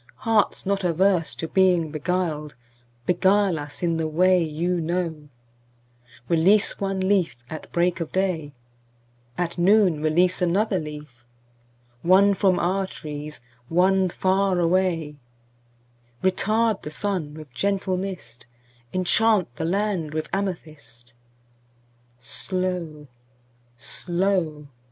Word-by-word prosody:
Hearts 220 -3 +1
not 195 0 0
averse 180 0 +1
to 165 - -4
being 180 -3 +2
beguiled, 155 -1 -2 0.5
Beguile 190 -1 +2
us 145 +3 -8
in 170 -1 +1
the 160 -1 -1
way 180 +3 +3
you 170 +3 -1
know; 165 -3 -3 1.0
Release 185 +5 +3
one 195 -1 -2
leaf 190 -4 +2 0.2
at 155 - -8
break 175 0 +1
of 165 - -4
day; 180 -6 -1 0.9
At 175 0 -2
noon 185 -4 +4
release 175 +4 +2
another 190 +3 +1
leaf; 150 -6 -9 0.8
One 195 +3 +5
from 190 -2 +2
our 190 +2 0
trees, 150 -4 -8 0.3
one 185 +2 +3
far 190 +1 +1
away; 170 -4 +1 1.1
Retard 215 +3 +1
the - - -6
sun 155 -2 -3
with 155 -5 -11
gentle 195 +5 0
mist; 180 -11 -7 0.5
Enchant 185 - +2
the 160 - -2
land 180 -4 -1
with 155 - -3
amethyst. 155 -11 -5 1.1
Slow, 170 +3 -3 0.7
slow! 175 0 -1
180 Hz, 110 wpm, -24 LUFS, 155-190 Hz, 1.1 s, One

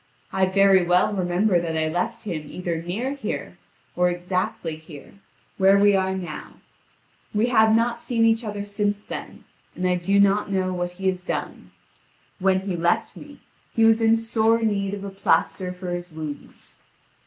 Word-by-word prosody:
I 190 0 +2
very 195 -1 +5
well 180 +4 +3
remember 180 0 +1
that 165 -1 -3
I 160 0 +1
left 175 +6 -2
him 160 -8 -5
either 170 -2 -3
near 215 +11 -3
here, 280 - -5 0.4
or 180 0 +3
exactly 175 -2 -2
here, 155 -2 -13 0.5
where 195 +1 +6
we 205 0 +5
are 190 0 0
now; 180 -2 -7 0.8
we 220 +4 +2
have 220 -2 +5
not 235 +1 +1
seen 230 -2 +1
each 225 +1 +3
other 205 -2 -4
since 205 0 -2
then, - - -8 0.3
and 185 - -1
I 180 - +2
do 185 +3 +1
not 200 +1 +3
know 185 -1 0
what 175 0 -3
he 190 +2 -8
has 185 -1 0
done. - - -5 0.7
When 190 0 +2
he 190 -2 -3
left 170 +1 0
me, - - -13 0.3
he 225 - +4
was 225 0 +4
in 225 0 +4
sore 225 0 +1
need 200 -2 0
of 200 - -8
a 200 - -6
plaster 190 -1 0
for 180 0 -6
his 175 0 -5
wounds. 155 -2 -9
190 Hz, 175 wpm, -24 LUFS, 175-210 Hz, 0.8 s, where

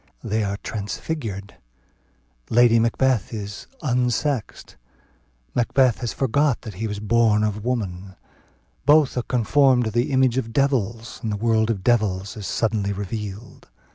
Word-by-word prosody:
They 110 +1 -1
are 100 0 -2
transfigured: 105 - -5 0.9
Lady 115 0 +5
Macbeth 115 -1 +1
is 105 -2 -6 0.2
"unsexed;" 125 0 -1 0.8
Macbeth 125 0 +2
has 120 -3 -3
forgot 140 +1 +1
that 110 - -7
he 110 +5 -4
was 105 -1 -4
born 110 0 +3
of 105 -1 -2
woman; 100 -6 -3 0.7
both 150 -1 +5
are 125 - 0
conformed 125 +2 +3
to 110 - -2
the 120 +4 0
image 130 -1 +3
of 115 -3 -5
devils; 115 -5 0
and 110 - -2
the 105 - -2
world 110 0 +2
of 100 -5 -2
devils 100 -5 +1
is 105 -3 -6
suddenly 105 -3 0
revealed. 100 +2 -6
115 Hz, 140 wpm, -23 LUFS, 105-125 Hz, 0.9 s, Lady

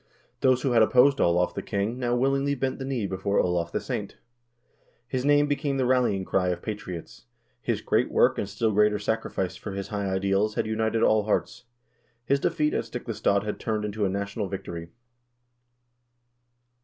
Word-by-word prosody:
Those 130 -1 +3
who 135 - +1
had 115 -2 +5
opposed 125 +5 +5
Olav 90 +1 +2
the - - -4
king 105 +5 -2
now 120 -1 0
willingly 135 +2 +1
bent 130 0 -2
the 135 - -4
knee 130 -6 -2
before 95 +1 -1
Olav 85 -1 0
the - - -1
saint. - - -5 0.9
His 125 0 -2
name 145 +1 +4
became 145 -1 -1
the 130 - +1
rallying 120 -7 +2
cry 90 -1 +1
of 90 -1 -2
patriots; 95 - -7 0.4
his - - -1
great - - +1
work - - +3
and 100 - -3
still 110 +2 0
greater 105 0 +3
sacrifice 105 -3 -2
for 100 - -7
his 100 0 -5
high 100 -2 -2
ideals 100 +3 +1
had - - 0
united 110 +1 0
all 110 -1 +3
hearts; 95 +2 -1 0.6
his 140 +3 +2
defeat 150 +2 0
at - - -1
Stiklestad 100 0 -1
had 105 - -4
turned 110 -2 -2
into 105 0 -3
a 100 - +2
national 100 +2 -3
victory. 85 -3 -6
105 Hz, 175 wpm, -26 LUFS, 100-125 Hz, 0.9 s, had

